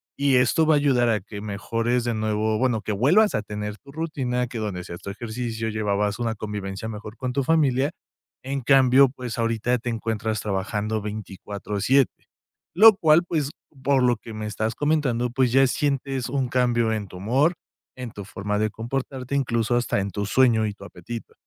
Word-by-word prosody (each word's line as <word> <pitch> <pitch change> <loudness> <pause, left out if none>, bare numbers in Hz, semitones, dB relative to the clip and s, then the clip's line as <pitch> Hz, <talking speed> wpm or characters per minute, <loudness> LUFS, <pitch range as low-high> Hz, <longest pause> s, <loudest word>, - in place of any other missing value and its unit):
y 140 -1 +2
esto 125 +5 +3
va 155 - +5
a - - +4
ayudar 130 -4 +3
a 110 -2 +2
que 100 +1 -9
mejores 115 +4 -1
de 120 0 -1
nuevo 110 0 0
bueno, 120 -4 +1
que 110 - -4
vuelvas 160 - +4
a 110 - 0
tener 105 0 -5
tu 140 - -15
rutina 135 -6 -2
que 120 -1 -6
donde 100 -4 -3
hacías 85 0 -9
tu - - -7
ejercicio, 115 +1 -4
llevabas 105 0 -1
una 115 -2 -1
convivencia 105 -1 -5
mejor 110 0 -8
con 125 +1 -3
tu 140 +1 0
familia, 140 -2 +2 0.5
en 135 +1 -3
cambio, 135 +1 +5
pues, 125 -2 -6
ahorita 115 +2 +1
te 125 - -4
encuentras 110 -1 -2
trabajando 105 +2 -2
24/7 105 +4 -1 0.5
lo 215 +3 +9
cual, 160 -3 +4
pues, 150 -5 -1 0.3
por 135 -1 +3
lo 125 -1 +4
que 110 +1 -10
me 110 0 -5
estás 110 +1 -2
comentando, 140 -5 +1
pues, 125 -1 +2
ya 135 +2 +5
sientes 135 -2 -1
un 135 -1 0
cambio 120 -2 +2
en 105 -2 -3
tu 90 - -11
humor, 130 - +2 0.4
en 125 -2 -6
tu 100 -2 -8
forma 105 +1 -3
de 110 0 +1
comportarte, 130 +3 -4
incluso 120 -3 +1
hasta 120 -3 +1
en 100 - -3
tu 100 +1 -3
sueño 115 0 +3
y 105 - -4
tu 100 -1 -13
apetito, 105 +5 -8
120 Hz, 185 wpm, -24 LUFS, 105-130 Hz, 0.5 s, lo